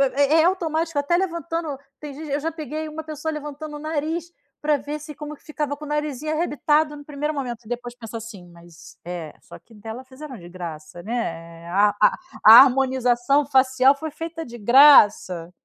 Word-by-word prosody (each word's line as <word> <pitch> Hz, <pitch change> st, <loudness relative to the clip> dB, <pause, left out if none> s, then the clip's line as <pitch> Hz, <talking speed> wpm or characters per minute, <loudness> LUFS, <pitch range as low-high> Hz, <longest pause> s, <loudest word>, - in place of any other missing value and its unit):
É 285 Hz, +3 st, +4 dB
é -, -, +3 dB
automático 330 Hz, -3 st, 0 dB
até 315 Hz, +5 st, +1 dB
levantando 335 Hz, -4 st, -3 dB, 0.2 s
tem 295 Hz, -2 st, -8 dB
gente 305 Hz, +2 st, -9 dB
eu 285 Hz, -, 0 dB
já 325 Hz, +3 st, -3 dB
peguei 310 Hz, 0 st, -6 dB
uma 315 Hz, +1 st, -7 dB
pessoa 310 Hz, +1 st, -5 dB
levantando 300 Hz, 0 st, -7 dB
o -, -, -10 dB
nariz 315 Hz, +2 st, -3 dB, 0.3 s
pra 300 Hz, -1 st, +2 dB
ver 290 Hz, +2 st, -6 dB
se 300 Hz, -1 st, -10 dB
como 300 Hz, 0 st, -8 dB
que -, -, -28 dB
ficava 295 Hz, -2 st, -4 dB
com 300 Hz, -, -9 dB
o -, -, -9 dB
narizinho 300 Hz, 0 st, -3 dB
arrebitado, 300 Hz, -1 st, +1 dB
no 290 Hz, -, -12 dB
primeiro 295 Hz, +1 st, -3 dB
momento 245 Hz, -5 st, -5 dB
e -, -, -14 dB
depois 245 Hz, 0 st, -5 dB
penso, 230 Hz, -1 st, -8 dB
assim: 215 Hz, -5 st, -10 dB
"Mas 170 Hz, -1 st, -16 dB
é, 170 Hz, -3 st, -6 dB
só -, -, -13 dB
que 230 Hz, -, -22 dB
dela 220 Hz, +4 st, -9 dB
fizeram 260 Hz, 0 st, -10 dB
de 175 Hz, -1 st, -12 dB
graça, 170 Hz, -2 st, -8 dB
né, 170 Hz, -7 st, -5 dB
eh, -, -, -10 dB
a 200 Hz, +4 st, +4 dB
a -, -, +5 dB, 0.3 s
a 220 Hz, -, +11 dB
harmonização 260 Hz, +1 st, +2 dB
facial 265 Hz, 0 st, +4 dB
foi 315 Hz, +2 st, -6 dB
feita 325 Hz, +1 st, -6 dB
de 240 Hz, -1 st, -10 dB
graça. 210 Hz, -, +5 dB
285 Hz, 195 wpm, -23 LUFS, 235-305 Hz, 0.3 s, a